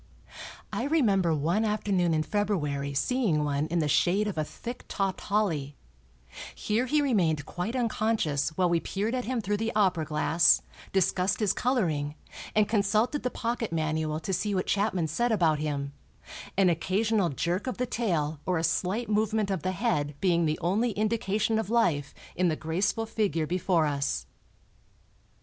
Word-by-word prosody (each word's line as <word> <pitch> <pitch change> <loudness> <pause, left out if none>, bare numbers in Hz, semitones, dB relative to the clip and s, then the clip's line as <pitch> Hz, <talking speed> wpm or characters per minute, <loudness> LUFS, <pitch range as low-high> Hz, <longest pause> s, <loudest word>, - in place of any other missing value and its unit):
I - - -1
remember 210 - +2
one 170 +9 +1
afternoon 200 -5 +1
in 155 - +1
February 150 -8 -1
seeing 180 - +1
one 145 +1 0
in 170 +2 -1
the 155 -3 +1
shade 185 +8 +2
of 205 - -3
a 155 - 0
thick 240 +10 -8
topped 195 -2 -2
holly; 165 -10 -1 0.8
here 225 +4 0
he 295 +3 +2
remained 170 - +1
quite 180 +10 -4
unconscious 220 - 0
while 185 -1 +3
we 170 -1 +2
peered 205 +7 -2
at 250 -1 -2
him 250 -1 -1
through 205 0 -1
the 225 +2 -1
opera 185 -6 +2
glass, 155 +3 +3 0.3
discussed 190 +1 +1
his 210 -4 +2
coloring 160 - 0 0.4
and 215 -1 +4
consulted 215 +6 +1
the 250 - -1
pocket 235 -3 -3
manual 155 -1 -1
to 190 +3 -3
see 200 +3 0
what 185 - 0
Chapman 200 -4 +1
said 235 +10 0
about 165 -8 +2
him, 140 -2 -3 0.6
an 195 -1 +5
occasional 190 +3 +1
jerk 175 - -2
of 255 - -3
the 250 - 0
tail 165 - -1
or 180 -2 +1
a 160 - -1
slight 195 +8 0
movement 215 -1 +1
of 190 -4 -1
the 185 - -1
head 160 - -1
being 170 -3 +2
the 155 0 0
only 210 +7 +1
indication 215 0 0
of 220 - -3
life 170 -12 +1 0.2
in 180 +1 +2
the 160 - +1
graceful 180 +8 -1
figure 195 -8 0
before 175 -1 +1
us. 140 - -1
190 Hz, 165 wpm, -28 LUFS, 160-220 Hz, 0.8 s, an